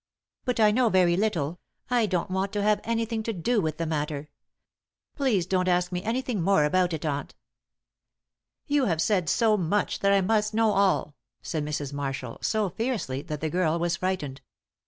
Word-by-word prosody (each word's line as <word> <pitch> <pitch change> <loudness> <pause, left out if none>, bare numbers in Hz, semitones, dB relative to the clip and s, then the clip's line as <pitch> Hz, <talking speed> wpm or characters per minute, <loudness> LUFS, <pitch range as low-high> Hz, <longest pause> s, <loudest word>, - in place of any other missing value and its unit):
"But 250 -3 -1
I 215 -1 +6
know 240 +1 +3
very 180 -3 +4
little; 175 -5 -1 0.3
I 240 -3 +3
don't 185 -1 -1
want 190 +1 -1
to 205 -1 -1
have 210 0 +2
anything 230 0 -1
to 225 - -2
do 215 +5 +1
with 155 -2 -2
the 165 - -2
matter. 150 -1 -3 0.9
Please 240 - +1
don't 185 0 0
ask 180 0 +2
me 180 0 -2
anything 230 -1 -2
more 170 -4 +3
about 180 +3 +2
it 160 0 -4
aunt." 145 -2 -3 1.3
"You 290 -3 +2
have 165 -7 0
said 180 -2 +1
so 215 +3 +3
much 200 +3 0
that 200 - +3
I 200 0 +4
must 215 +2 +1
know 225 -1 +3
all," 195 -7 +1 0.3
said 155 -3 -2
Mrs. 145 -2 -3
Marshall, 135 -4 -4
so 215 -4 0
fiercely 200 - -2
that 150 -2 -6
the 160 - -1
girl 170 -2 +1
was 170 0 0
frightened. 150 -8 -3
185 Hz, 180 wpm, -26 LUFS, 160-215 Hz, 1.3 s, I